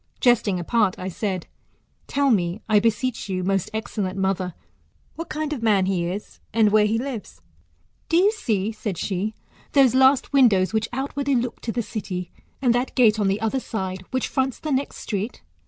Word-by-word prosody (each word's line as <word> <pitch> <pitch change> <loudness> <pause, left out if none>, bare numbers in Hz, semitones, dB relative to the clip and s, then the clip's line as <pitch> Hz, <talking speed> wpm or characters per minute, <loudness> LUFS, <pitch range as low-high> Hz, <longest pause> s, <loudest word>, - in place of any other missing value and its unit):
Jesting 215 -6 +3
apart, 205 +2 +1
I 185 - -4
said, 185 -1 -3 0.6
tell 280 -1 +2
me, 180 -2 +1
I 215 -1 +5
beseech 230 +1 -1
you, 185 -1 -1
most 195 -1 0
excellent 205 -3 -3
mother, 190 -2 -1 0.6
what 330 - -7
kind 305 0 -2
of 265 - -5
man 205 -4 +3
he 185 -3 0
is, 185 +4 -6
and 215 -2 +3
where 210 0 +5
he 220 +2 +1
lives? 250 -3 -6 0.7
po 330 - +3
you 390 +4 +5
see, 220 - -1
said 215 -4 -4
she, 200 +4 -2 0.4
those 270 -4 +5
last 265 +1 +4
windows 220 -8 +4
which 220 0 0
outwardly 275 +2 -1
look 240 -1 -2
to 230 - -3
the 235 +1 -1
city, 185 -5 -5 0.3
and 245 -2 +4
that 245 +2 -1
gate 225 -4 +5
on 205 - +2
the 195 +2 +1
other 225 +4 0
side, 190 -6 -4
which 260 -1 -1
fronts 265 -1 -1
the 310 - -4
next 275 +1 -1
street 210 +2 -4
220 Hz, 185 wpm, -23 LUFS, 195-255 Hz, 0.7 s, I